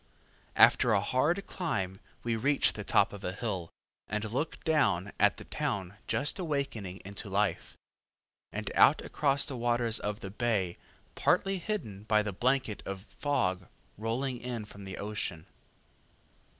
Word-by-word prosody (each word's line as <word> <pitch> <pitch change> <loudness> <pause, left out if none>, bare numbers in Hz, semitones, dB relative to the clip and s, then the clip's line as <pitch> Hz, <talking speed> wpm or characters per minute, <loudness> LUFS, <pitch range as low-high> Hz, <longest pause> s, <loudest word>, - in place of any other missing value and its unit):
After - - +6
a - - +5
hard 145 - +1
climb 95 - -2 0.2
we 115 -1 0
reach 140 +5 +3
the 105 - -5
top 100 - +3
of 100 - -8
the 90 - -3
hill, 95 -6 -3 0.4
and 105 0 -1
look 145 +7 -2
down 100 - +2
at - - +4
the - - -8
town 95 -2 -2
just 145 +7 0
awakening 135 - -3
into 100 +1 -5
life, 100 +1 0 0.7
and - - -4
out - - +6
across 140 -2 +1
the 140 - -4
waters 120 -1 +1
of 105 +1 -3
the 95 - -6
bay 105 -6 0 0.3
partly 195 -1 +2
hidden 110 - -4
by 105 -1 +3
the 105 -1 -3
blanket 125 0 +1
of 95 -1 -4
fog 95 -7 -1 0.3
rolling 120 +4 -2
in 120 -3 -4
from 100 -1 -11
the 95 - -6
ocean. 100 -5 -4
110 Hz, 150 wpm, -31 LUFS, 100-135 Hz, 0.7 s, After